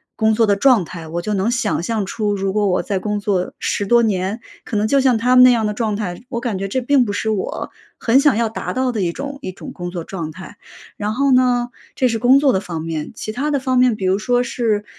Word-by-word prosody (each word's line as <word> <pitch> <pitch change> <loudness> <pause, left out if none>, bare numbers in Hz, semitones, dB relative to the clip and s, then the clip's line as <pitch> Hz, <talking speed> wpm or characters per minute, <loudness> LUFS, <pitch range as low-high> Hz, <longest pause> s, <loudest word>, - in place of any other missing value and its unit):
工 220 -1 +2
作 225 0 +3
的 200 -1 +3
状 235 -4 +4
态， 165 -1 -9
我 170 +2 -3
就 210 - -2
能 200 +3 0
想 235 -8 0
象 215 +1 -2
出 205 0 -2
如 195 -1 -2
果 210 -1 +1
我 180 - +1
在 195 -3 -2
工 210 +1 -2
作 195 -3 -1
10 205 - -2
多 235 +1 +4
年， 200 +1 -1 0.2
可 215 - -3
能 215 +1 +1
就 280 +2 +3
像 255 -3 +3
他 250 +3 +2
们 250 - +8
那 255 - +8
样 230 -3 +1
的 210 - -1
状 215 -2 -1
态， 180 -3 -4
我 235 -3 -3
感 230 -6 -3
觉 195 - -3
这 260 - -1
并 265 0 +3
不 205 - -3
是 210 +2 -2
我 200 -3 -3 0.3
很 240 +3 +3
想 280 -6 +3
要 235 - +1
达 220 - -5
到 255 0 0
的 220 -4 -2
一 175 -2 0
种 280 +4 -6
一 185 - -5
种 185 - -10
工 175 -1 -6
作 175 -2 -5
状 170 -4 -5
态， 190 +4 -11 0.4
然 210 +1 -2
后 275 0 +2
呢 245 -1 +3 0.3
这 255 - +2
是 230 -2 -1
工 255 +4 +5
作 280 -2 +3
的 190 - +2
方 165 -4 -6
面。 160 -2 -4
其 215 - -5
它 280 +7 -2
的 285 -2 +1
方 255 -1 0
面 250 -3 +4
比 190 - -4
如 190 +2 +2
说 245 +2 +1
是 220 -4 -1
215 Hz, 285 characters per minute, -19 LUFS, 195-250 Hz, 0.4 s, 们